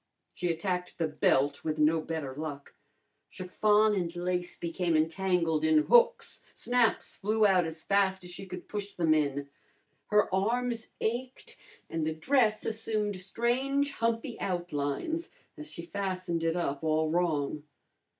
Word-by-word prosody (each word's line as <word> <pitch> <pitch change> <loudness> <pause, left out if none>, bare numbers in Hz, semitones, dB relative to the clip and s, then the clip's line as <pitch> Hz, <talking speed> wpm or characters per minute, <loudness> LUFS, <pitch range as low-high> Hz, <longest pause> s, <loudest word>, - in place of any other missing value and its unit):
She 180 - -3
attacked 180 +2 -2
the 165 - 0
belt 145 -2 +1
with 155 -1 -2
no 155 +1 +3
better 155 -4 -4
luck. 145 -1 -6 0.6
Chiffon 210 +3 +2
and 175 -3 -2
lace 180 0 -2
became 170 -1 0
entangled 165 -1 +1
in 155 -1 +4
hooks, 485 0 +3
snaps 245 -2 +1
flew 215 +2 +1
out 185 -3 +4
as 160 0 -7
fast 195 -2 +2
as 180 - -8
she 195 +2 -8
could 180 -1 -8
push 205 -1 -5
them 165 -3 +3
in. 145 -2 0 0.6
Her 210 0 +4
arms 230 +4 0
ached, 250 +3 -3 0.3
and 165 -1 -2
the 155 0 -1
dress 220 - +2
assumed 215 -2 -1
strange 260 +8 0
humpy 230 -2 -2
outlines 175 - -2 0.3
as 305 -1 -9
she 170 - -9
fastened 185 -2 -3
it 165 0 +1
up 145 -4 -2
all 155 0 +1
wrong. 155 -4 0
180 Hz, 140 wpm, -30 LUFS, 160-215 Hz, 0.6 s, in